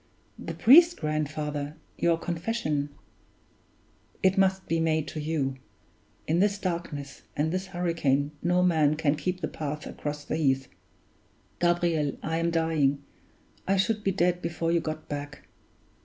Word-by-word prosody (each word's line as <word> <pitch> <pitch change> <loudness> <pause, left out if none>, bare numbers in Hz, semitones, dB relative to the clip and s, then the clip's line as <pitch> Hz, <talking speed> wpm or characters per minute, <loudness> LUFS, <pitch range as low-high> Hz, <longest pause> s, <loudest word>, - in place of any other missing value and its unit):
"The - - -6
priest, 335 +7 +7
grandfather 150 -1 -2 0.2
your 170 -1 +2
confession 165 -4 -2 0.6
" - - -35
"It 190 0 +4
must 190 -1 +2
be 165 - +1
made 160 -2 +1
to 155 - -5
you. 150 -4 -1 0.7
In 165 +3 +1
this 200 +1 +3
darkness 170 -7 -4 0.2
and 155 +2 +1
this 185 +1 -2
hurricane 165 -6 0
no 180 +1 +2
man 155 -4 +3
can 150 -2 +2
keep 180 +4 -3
the 155 - -1
path 150 0 -5
across 145 0 -5
the - - -2
heath. 135 -4 +1 0.9
Gabriel, 170 -4 +1
I 160 +1 -1
am 170 0 +1
dying 155 -4 +1 0.6
I 195 +1 +3
should 210 +2 +1
be 195 - +2
dead 180 -1 +1
before 170 0 -1
you 170 - +3
got 155 -1 -5
back. 145 -1 -6
160 Hz, 145 wpm, -27 LUFS, 150-180 Hz, 0.9 s, priest